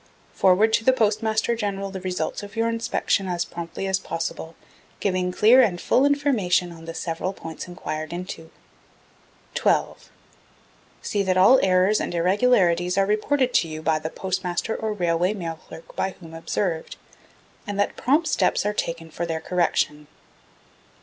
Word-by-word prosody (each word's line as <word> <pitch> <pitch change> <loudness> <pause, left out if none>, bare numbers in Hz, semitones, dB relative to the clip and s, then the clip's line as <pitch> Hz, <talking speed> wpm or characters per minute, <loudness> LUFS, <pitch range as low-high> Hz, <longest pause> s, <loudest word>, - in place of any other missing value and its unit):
Forward 200 +4 +4
to 225 - +3
the 260 - +5
Postmaster 220 0 +1
General 200 -3 -3
the 190 -1 -6
result 185 +2 -3
of 205 +1 -10
your 225 0 +1
inspection 230 -3 0
as 175 -2 -1
promptly 170 +3 -6
as 190 0 +1
possible, 165 -1 -5 0.4
giving 185 -2 0
clear 230 +7 +6
and 190 -8 +1
full 265 +9 +3
information 235 -12 +1
on 165 -1 -12
the 165 0 -7
several 175 +3 -3
points 165 -2 -8
enquired 155 -3 -5
into. 175 -2 -7 1.0
12. - - 0 0.9
See 205 - -1
that 185 -1 +1
all 250 +8 +7
errors 185 +3 +3
and - - -3
irregularities 180 -1 +2
are 195 - +4
reported 250 +5 +1
to 165 - +3
you 155 0 -7
by 160 -1 +2
the 155 +1 -4
Postmaster 185 +3 -2
or 220 -1 -3
Railway 180 0 0
Mail 165 -4 -5
Clerk 160 +1 -12
by 190 - -2
whom 165 -3 -12
observed, 165 +1 -3 0.7
and 205 -1 -4
that 205 - +1
prompt 300 +6 +2
steps - - +1
are 210 - 0
taken 165 -4 -4
for 170 +2 -4
their 165 -1 -2
correction. 160 -3 0
185 Hz, 155 wpm, -24 LUFS, 170-215 Hz, 1.0 s, all